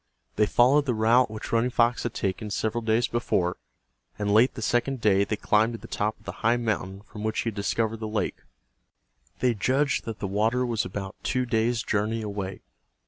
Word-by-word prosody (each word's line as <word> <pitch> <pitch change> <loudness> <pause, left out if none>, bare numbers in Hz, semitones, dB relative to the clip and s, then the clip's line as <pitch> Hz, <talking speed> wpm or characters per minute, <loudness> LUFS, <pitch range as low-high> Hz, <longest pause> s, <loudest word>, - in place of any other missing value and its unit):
They 105 - +3
followed 140 +6 +4
the 125 - +1
route 115 +3 +4
which 110 0 -7
Running 115 +2 +2
Fox 120 0 +2
had 120 - -4
taken 100 +2 -2
several 110 +3 -1
days 110 +2 +2
before, 90 -7 0 0.6
and 105 -1 0
late 115 +5 +5
the 120 - -6
second 120 +3 0
day 100 -3 +3
they 110 - -1
climbed 110 +3 +2
to - - -4
the - - -12
top 105 +1 -2
of - - -26
the - - -4
high 115 +2 +3
mountain 100 -4 -2
from 105 0 -9
which 110 0 0
he 115 - -1
had 110 - -8
discovered 110 +2 -1
the 110 - -4
lake. 105 -3 -2 1.0
They 125 -2 +3
judged 135 +7 +1
that 115 -2 -5
the - - -4
water 110 +6 +1
was 115 -4 -1
about 95 +1 -6
two 130 0 0
days' 115 0 +1
journey 110 +2 -1
away. 100 -2 -5
110 Hz, 200 wpm, -26 LUFS, 105-120 Hz, 1.0 s, late